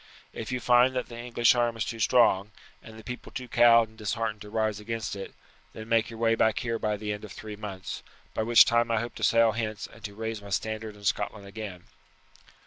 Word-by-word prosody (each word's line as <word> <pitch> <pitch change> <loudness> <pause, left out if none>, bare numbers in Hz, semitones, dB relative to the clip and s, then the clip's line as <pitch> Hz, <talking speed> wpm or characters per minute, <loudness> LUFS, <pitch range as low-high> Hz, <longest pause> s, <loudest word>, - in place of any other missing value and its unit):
If 110 +2 -6
you 125 - -1
find 125 +2 +4
that 125 - -2
the 120 -1 -8
English 120 -1 +3
arm 120 -2 0
is 110 - -1
too 115 - -5
strong, 105 -3 +4 0.3
and 110 0 -12
the 110 - -11
people 125 +1 -7
too 130 -1 -6
cowed 115 -1 +6
and 110 0 -20
disheartened 110 0 -2
to 105 - -9
rise 110 -1 -1
against 110 0 -4
it, 95 - -8 0.4
then 110 0 -9
make 115 -1 +2
your 115 - -9
way 115 0 +2
back 110 -1 +2
here 115 -3 -2
by 105 -1 -1
the 105 0 -3
end 105 - -8
of 105 - -9
three 105 +6 -8
months, 100 -3 -6 0.3
by - - -1
which 115 +1 +7
time 120 0 +2
I 115 -1 +2
hope 120 +2 -4
to - - -6
sail 115 -1 +5
hence 110 -1 -3
and 110 - -15
to 100 -1 -7
raise 110 0 -4
my 100 - -10
standard 110 +2 -3
in 105 - -16
Scotland 105 +1 -1
again." 100 -3 -8
110 Hz, 230 wpm, -28 LUFS, 105-115 Hz, 0.4 s, which